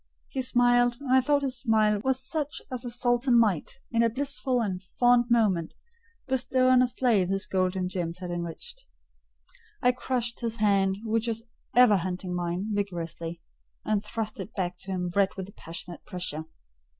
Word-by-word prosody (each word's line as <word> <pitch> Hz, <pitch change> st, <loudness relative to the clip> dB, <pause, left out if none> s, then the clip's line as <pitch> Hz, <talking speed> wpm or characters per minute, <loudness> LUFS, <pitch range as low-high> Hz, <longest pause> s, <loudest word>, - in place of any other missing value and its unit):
He 265 Hz, -, -2 dB
smiled; 245 Hz, -1 st, +3 dB
and 270 Hz, -3 st, -1 dB
I 260 Hz, -, +6 dB
thought 285 Hz, +2 st, +2 dB
his 260 Hz, -2 st, 0 dB
smile 215 Hz, -3 st, +2 dB
was 265 Hz, 0 st, +1 dB
such 300 Hz, -2 st, -2 dB
as 250 Hz, -1 st, -4 dB
a 245 Hz, -, -4 dB
sultan 245 Hz, +1 st, +2 dB
might, 205 Hz, -9 st, +1 dB
in 230 Hz, -1 st, +2 dB
a 230 Hz, -, +4 dB
blissful 270 Hz, 0 st, -1 dB
and 190 Hz, -5 st, -2 dB
fond 245 Hz, +5 st, +3 dB
moment, 205 Hz, -9 st, +2 dB, 0.5 s
bestow 255 Hz, 0 st, +2 dB
on 255 Hz, -1 st, +6 dB
a 255 Hz, -, +4 dB
slave 230 Hz, -7 st, +2 dB
his 195 Hz, 0 st, +1 dB
gold 185 Hz, 0 st, 0 dB
and 185 Hz, -1 st, -1 dB
gems 175 Hz, -2 st, -3 dB
had 180 Hz, -1 st, -6 dB
enriched: 175 Hz, -, -6 dB, 0.9 s
I 250 Hz, -, +4 dB
crushed 245 Hz, -2 st, -2 dB
his 230 Hz, -2 st, -2 dB
hand, 195 Hz, -3 st, +2 dB
which 225 Hz, +1 st, 0 dB
was 225 Hz, 0 st, -1 dB, 0.3 s
ever 245 Hz, -5 st, +7 dB
hunting 180 Hz, 0 st, -3 dB
mine, 175 Hz, +3 st, -2 dB
vigorously, 170 Hz, -4 st, -4 dB, 0.4 s
and 215 Hz, -1 st, +1 dB
thrust 215 Hz, +1 st, -4 dB
it 195 Hz, +3 st, -7 dB
back 180 Hz, -2 st, -2 dB
to 190 Hz, -, -11 dB
him 180 Hz, -1 st, -2 dB
red 200 Hz, -1 st, +2 dB
with 190 Hz, -, -4 dB
the 200 Hz, -, -13 dB
passionate 170 Hz, +1 st, -8 dB
pressure. 160 Hz, -4 st, -4 dB
220 Hz, 175 wpm, -27 LUFS, 185-245 Hz, 0.9 s, ever